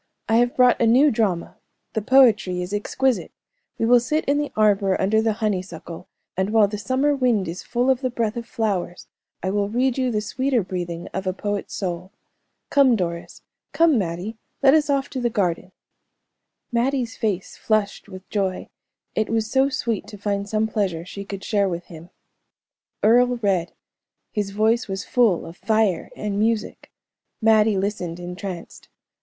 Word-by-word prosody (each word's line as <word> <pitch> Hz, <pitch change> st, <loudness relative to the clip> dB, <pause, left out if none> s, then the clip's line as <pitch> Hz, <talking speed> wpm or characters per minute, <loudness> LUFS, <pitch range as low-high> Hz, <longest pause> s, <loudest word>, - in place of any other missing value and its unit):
"I 225 Hz, -, +3 dB
have 245 Hz, +1 st, +2 dB
brought 250 Hz, -1 st, +4 dB
a 230 Hz, -, +4 dB
new 265 Hz, +6 st, +5 dB
drama; 200 Hz, -7 st, -1 dB, 0.4 s
the 220 Hz, -, -1 dB
poetry 215 Hz, -7 st, +4 dB
is 180 Hz, +3 st, -7 dB
exquisite. 255 Hz, +5 st, 0 dB, 0.5 s
We -, -, 0 dB
will 245 Hz, +1 st, +6 dB
sit 300 Hz, +6 st, -1 dB
in 285 Hz, +1 st, +2 dB
the 295 Hz, -1 st, -2 dB
arbor 200 Hz, -3 st, +3 dB
under 215 Hz, +3 st, +2 dB
the 220 Hz, -1 st, +1 dB
honeysuckle, 185 Hz, -6 st, -4 dB, 0.3 s
and 190 Hz, +2 st, 0 dB
while 215 Hz, -1 st, +4 dB
the 205 Hz, 0 st, -5 dB
summer 260 Hz, +8 st, +1 dB
wind 245 Hz, -8 st, +1 dB
is 170 Hz, +3 st, -5 dB
full 245 Hz, +1 st, -1 dB
of 260 Hz, -1 st, +2 dB
the 255 Hz, -, 0 dB
breath 230 Hz, -2 st, -2 dB
of 235 Hz, -1 st, -5 dB
flowers, 200 Hz, -8 st, -2 dB, 0.4 s
I 190 Hz, -, 0 dB
will 200 Hz, 0 st, 0 dB
read 255 Hz, +3 st, 0 dB
you 255 Hz, -1 st, +1 dB
the 215 Hz, -3 st, 0 dB
sweeter 245 Hz, +3 st, 0 dB
breathing 175 Hz, -2 st, -5 dB
of 190 Hz, +1 st, -3 dB
a 185 Hz, -, +1 dB
poet's 205 Hz, +1 st, -4 dB
soul. 180 Hz, -1 st, -4 dB, 0.6 s
Come, 275 Hz, -4 st, +5 dB
Doris 170 Hz, -4 st, -4 dB, 0.3 s
come, 325 Hz, -7 st, +4 dB
Mattie 185 Hz, +5 st, -4 dB, 0.2 s
let 270 Hz, 0 st, +7 dB
us 305 Hz, -1 st, +3 dB
off 275 Hz, -1 st, +1 dB
to 260 Hz, -, -3 dB
the 240 Hz, -, +1 dB
garden." 185 Hz, -5 st, -1 dB, 1.0 s
Mattie's 245 Hz, 0 st, 0 dB
face 195 Hz, -4 st, -2 dB
flushed 210 Hz, -1 st, -1 dB
with 185 Hz, -1 st, -11 dB
joy; 195 Hz, -3 st, -2 dB, 0.4 s
it 215 Hz, 0 st, -1 dB
was 220 Hz, -1 st, -1 dB
so 270 Hz, +1 st, +3 dB
sweet 230 Hz, -6 st, -2 dB
to 205 Hz, -, -10 dB
find 200 Hz, 0 st, -2 dB
some 215 Hz, +1 st, +1 dB
pleasure 190 Hz, -6 st, -2 dB
she 200 Hz, +2 st, -7 dB
could 195 Hz, -1 st, -7 dB
share 200 Hz, -3 st, +1 dB
with 175 Hz, 0 st, -4 dB
him. 165 Hz, +2 st, -11 dB, 0.9 s
Earle 245 Hz, +3 st, +4 dB
read; 185 Hz, -4 st, +1 dB, 0.6 s
his 210 Hz, -3 st, -2 dB
voice 220 Hz, +4 st, +1 dB
was 195 Hz, 0 st, -4 dB
full 230 Hz, -8 st, +2 dB
of 165 Hz, +2 st, -10 dB
fire 215 Hz, -6 st, +1 dB
and 205 Hz, -1 st, -3 dB
music. 220 Hz, 0 st, -1 dB, 0.5 s
Mattie 220 Hz, -2 st, +4 dB
listened 190 Hz, -4 st, -3 dB
entranced. 180 Hz, 0 st, -7 dB
210 Hz, 170 wpm, -23 LUFS, 190-240 Hz, 1.0 s, let